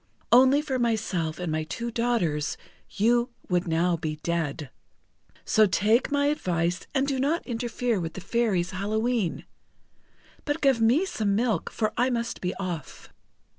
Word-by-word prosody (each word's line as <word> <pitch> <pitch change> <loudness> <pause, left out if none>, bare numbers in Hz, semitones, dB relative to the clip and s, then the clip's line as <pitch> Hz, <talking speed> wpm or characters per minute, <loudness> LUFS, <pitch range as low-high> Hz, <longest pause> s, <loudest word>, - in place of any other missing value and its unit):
Only 265 +4 +6
for 265 -4 -2
myself 200 -9 -1
and 180 -3 -3
my 155 0 -1
two 235 +9 -5
daughters, 220 -11 0 0.3
you 235 +4 +2 0.2
would 180 0 +1
now 170 +2 +2
be 155 -2 -3
dead. 160 -4 -2 0.7
So 215 -1 +4
take 215 +8 +2
my 285 0 +2
advice 180 - -1
and 270 0 +3
do 275 -2 -1
not 295 +6 0
interfere 240 -2 -1
with 165 -2 -4
the 190 - -6
Fairies' 195 -4 0
Hallowe'en. 215 0 -1 1.0
But 290 +1 -2
give 270 -6 +3
me 250 +11 +4
some 210 - -1
milk, 220 -5 0
for 215 -1 -1
I 245 +2 +3
must 235 -1 -3
be 180 0 -2
off." 180 -6 -6
220 Hz, 150 wpm, -26 LUFS, 175-245 Hz, 1.0 s, Only